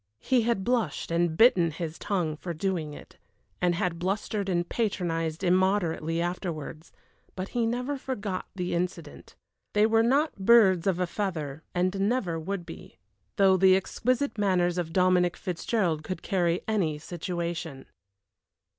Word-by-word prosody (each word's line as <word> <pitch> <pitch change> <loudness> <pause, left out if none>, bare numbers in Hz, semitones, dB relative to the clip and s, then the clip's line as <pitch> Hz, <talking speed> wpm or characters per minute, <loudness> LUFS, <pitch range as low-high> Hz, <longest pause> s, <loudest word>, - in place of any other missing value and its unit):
He 250 - +2
had 230 -4 0
blushed 230 -10 -1
and 170 -1 +1
bitten 190 -8 +5
his 160 0 -6
tongue 175 -7 -1
for 170 +2 -6
doing 160 -4 -2
it, - - -14 0.4
and 175 -1 +2
had 170 -1 -1
blustered 195 +2 -2
and 175 -1 0
patronized 170 -6 -2
immoderately 180 -3 +1
afterwards, 170 -3 -4 0.4
but 185 +1 -5
he 235 -2 0
never 250 +5 -2
forgot 210 -8 -4
the 180 -2 -2
incident. 180 +1 -4 0.4
They 210 +1 +4
were 225 0 +4
not 275 +3 +1
birds 190 -4 +5
of 190 -3 +2
a 180 - +2
feather, 160 -7 -4
and 185 +2 0
never 190 -10 -1
would 180 +2 -4
be, - - -11 0.4
though 190 -1 +5
the 190 0 +6
exquisite 250 +6 -1
manners 180 -3 +2
of 165 -2 -3
Dominic 180 -1 +3
Fitzgerald 175 -3 -1
could 185 +3 -5
carry 175 -3 +1
any 185 -9 0
situation. 170 -3 -5
180 Hz, 145 wpm, -27 LUFS, 170-205 Hz, 0.4 s, the